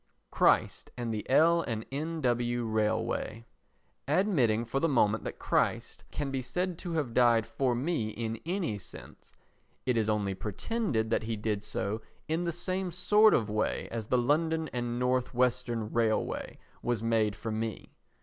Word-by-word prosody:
Christ - - +2
and 120 -2 -2
the 105 - -5
L. 165 +5 +5
& 110 - -9
N.W. 125 -6 -1
Railway 110 +1 -1 0.6
Admitting 125 - +2
for 125 +4 -1
the 165 - +2
moment 110 -5 +2
that - - -5
Christ - - -1
can 145 -2 -3
be 135 -1 -1
said 175 +8 -2
to 175 -2 -5
have 145 -8 -1
died 120 -2 +4
for 130 -3 0
me 125 -4 -1
in 115 0 -4
any 170 - -2
sense, - - -12 0.5
it 125 -2 +1
is 110 -1 +1
only 105 -2 0
pretended 110 - -2
that - - +2
he 115 0 -3
did 105 -1 -2
so 105 0 -3 0.3
in 160 +3 0
the 170 - 0
same 185 +2 -2
sort 210 +5 +5
of 110 - +1
way 105 0 -1
as 115 -2 -4
the 125 - +2
London 160 +5 +1
and 120 -1 -2
North 125 0 0
Western 120 -3 0
Railway 115 -2 0 0.2
was 120 -3 -1
made 110 -3 +2
for 115 - -5
me. 110 -1 -4
120 Hz, 160 wpm, -30 LUFS, 110-155 Hz, 0.6 s, L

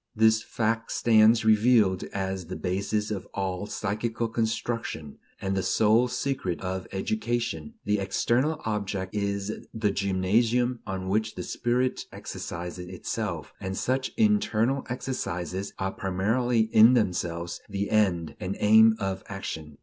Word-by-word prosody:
This 110 0 +4
fact 115 0 -1
stands 110 0 +5
revealed 110 -4 +4
as 95 -2 -4
the 95 - -5
basis 100 +3 -1
of 100 -3 -4
all 95 0 -2
psychical 110 +3 -2
construction, 115 -9 -3 0.2
and 95 0 -2
the 95 - +1
sole 110 +6 +3
secret 125 -10 -2
of 95 0 -4
education. 120 - -2
The 105 0 +1
external 120 +10 +1
object 100 -3 -2
is 100 0 -3
the 110 -2 +1
gymnasium 110 +6 +1
on 95 -1 -4
which 110 +3 0
the - - -4
spirit 125 +2 -1
exercises 90 +1 -6
itself, 90 -1 -4
and 95 0 -4
such 130 +1 0
"internal" 140 - +2
exercises 100 - -3
are 95 0 -1
primarily 110 +6 +1
"in 115 +4 +8
themselves" 85 -5 -1
the 100 0 -2
end 95 -7 +2
and 95 +2 -4
aim 110 +1 +6
of 95 -1 -2
action. 80 -6 -6
105 Hz, 130 wpm, -27 LUFS, 95-115 Hz, 0.2 s, in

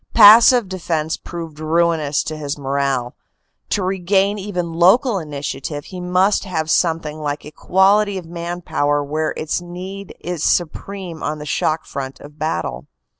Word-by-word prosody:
Passive 230 +2 +8
defense 165 -4 -2
proved 165 -3 -8
ruinous 155 -2 +1
to 155 - -5
his 145 -2 -4
morale; 135 -3 -1 0.6
to 200 - 0
re 190 +1 -1
gain 195 +3 +2
even 180 -4 -3
local 195 +7 +4
initiative 145 -1 -5
he 185 -2 -8
must 185 +3 +2
have 160 -5 -2
something 160 -3 0
like 145 -1 -3
equality 195 +6 +2
of 180 - -6
man 170 +1 -5
power 145 -2 0
where 155 +2 -1
its 155 +3 -2
need 185 +2 -8
is 175 -3 -4
supreme 175 0 -1
on 155 - -2
the 150 - -8
shock 155 +1 0
front 135 -1 -6
of 145 +1 -14
battle. 85 - -3
165 Hz, 150 wpm, -19 LUFS, 150-185 Hz, 0.6 s, Passive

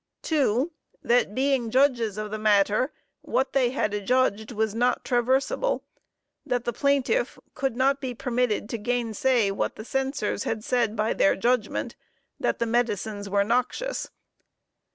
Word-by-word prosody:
2. 280 -1 +1 0.3
That 235 -3 +2
being 265 -3 +1
judges 240 -5 +2
of 215 -1 -4
the 215 - -3
matter, 210 +4 +3 0.3
what 265 +1 -1
they 260 -3 +3
had 225 -5 -1
adjudged 220 0 +1
was 220 -2 -1
not 245 +2 +1
traversable. 260 - +1 0.6
That 245 -1 -2
the 240 - -1
plaintiff 280 - +1 0.2
could 270 -3 -2
not 270 +2 +2
be 255 -3 -4
permitted 240 -3 -1
to 230 - -3
gainsay, 235 -1 +1
what 195 - -2
the 215 - -9
Censors 270 -6 -1
had 220 -1 -3
said 235 -3 +1
by 215 0 +1
their - - +3
judgment 235 +1 0 0.4
that - - 0
the 235 - 0
medicines 220 -3 -1
were 200 0 +3
noxious. 250 - -1
240 Hz, 145 wpm, -26 LUFS, 215-260 Hz, 0.6 s, matter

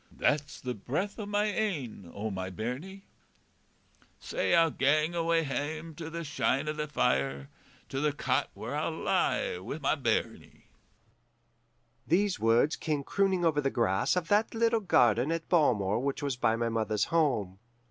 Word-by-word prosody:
That's 150 0 0
the 125 -1 -4
breath 150 - -3
o' 210 - -4
my 205 0 +1
ain, 160 - -2
o' 110 +2 -4
my 95 -1 -4
bairnie. 130 - -5 1.2
Sae - - 0
I'll 165 -1 +4
gang 155 +5 +2
awa' 165 -1 +1
hame, 155 +3 -4
to 160 +1 -7
the 170 +1 -5
shine 150 -1 0
o' 150 - 0
the 150 0 -3
fire, 70 - 0 0.4
To 135 - -3
the 150 0 +2
cot 145 - 0
where - - -5
I - - -1
lie 90 - 0
wi' 110 +10 -5
my 140 -4 +1
bairnie.' 130 -7 -2 1.4
"These 195 +4 +2
words 115 +7 +3
came 150 -3 -2
crooning 190 +1 +1
over 150 -3 +2
the 135 - +1
grass 110 - +1
of 180 -2 -1
that 210 +3 +2
little 230 0 +2
garden 125 - +3
at 165 0 -3
Balmore 115 - +2
which 140 +2 -2
was 140 -3 -1
by 115 -2 +2
my 115 0 -1
mother's 110 -2 0
home. 115 - +1
145 Hz, 160 wpm, -30 LUFS, 115-170 Hz, 1.4 s, I'll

